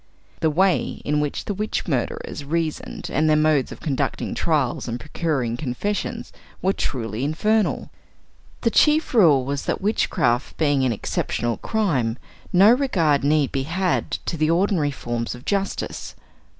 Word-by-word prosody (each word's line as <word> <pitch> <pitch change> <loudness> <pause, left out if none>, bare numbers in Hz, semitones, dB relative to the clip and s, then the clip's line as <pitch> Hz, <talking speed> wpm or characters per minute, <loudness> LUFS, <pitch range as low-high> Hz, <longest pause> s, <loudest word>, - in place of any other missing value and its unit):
The 160 - +2
way 185 +4 +1
in 150 0 +1
which 150 -1 -2
the 205 - -2
witch 210 +2 -3
murderers 140 0 -2
reasoned, 160 +1 -3
and 155 +2 +2
their 155 - +5
modes 155 -3 +2
of - - -9
conducting 140 -3 -2
trials 145 -8 0
and 120 +1 -3
procuring 140 -5 -2
confessions, 155 +11 -3 0.3
were 190 +1 +1
truly 115 - -3
infernal. 210 +9 0 0.7
The 230 - +2
chief 305 +3 +3
rule 155 - +5
was 140 +1 -3
that - - -1
witchcraft 135 - 0
being 145 -4 +2
an 130 - +2
"exceptional 115 +1 -2
crime," 140 - 0 0.3
no 195 +4 +7
regard 170 - +2
need 145 -1 +2
be 135 - -1
had 175 +6 -1 0.2
to 165 - -2
the 155 0 +2
ordinary 170 -3 +2
forms 120 -3 -4
of 120 - -13
justice. 200 -1 -2
155 Hz, 150 wpm, -23 LUFS, 135-185 Hz, 0.7 s, no